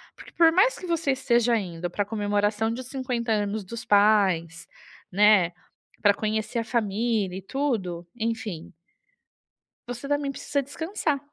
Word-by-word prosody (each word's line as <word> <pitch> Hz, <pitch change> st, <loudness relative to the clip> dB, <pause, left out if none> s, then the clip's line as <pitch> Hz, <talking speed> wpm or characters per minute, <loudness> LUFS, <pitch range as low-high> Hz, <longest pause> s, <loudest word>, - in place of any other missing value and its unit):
Porque, -, -, -13 dB
por 330 Hz, -1 st, +5 dB
mais 420 Hz, +8 st, +4 dB
que -, -, -8 dB
você 330 Hz, -4 st, +1 dB
esteja 240 Hz, -3 st, +2 dB
indo 175 Hz, -4 st, -4 dB
para 205 Hz, +3 st, -1 dB
comemoração 205 Hz, +1 st, 0 dB
de 250 Hz, +3 st, -5 dB
50 250 Hz, -3 st, -2 dB
anos 205 Hz, -1 st, -1 dB
dos 230 Hz, +3 st, -7 dB
pais, 195 Hz, -6 st, +3 dB, 0.5 s
né, 200 Hz, -3 st, +5 dB, 0.5 s
para 205 Hz, -1 st, +5 dB
conhecer 220 Hz, +3 st, -2 dB
a -, -, -1 dB
família 215 Hz, -4 st, -1 dB
e -, -, -6 dB
tudo, 195 Hz, -8 st, -2 dB
enfim 220 Hz, -7 st, -4 dB, 1.2 s
você 245 Hz, +3 st, -6 dB
também 290 Hz, -1 st, 0 dB
precisa 280 Hz, +1 st, -2 dB
descansar. 310 Hz, +1 st, -2 dB
220 Hz, 140 wpm, -26 LUFS, 200-255 Hz, 1.2 s, por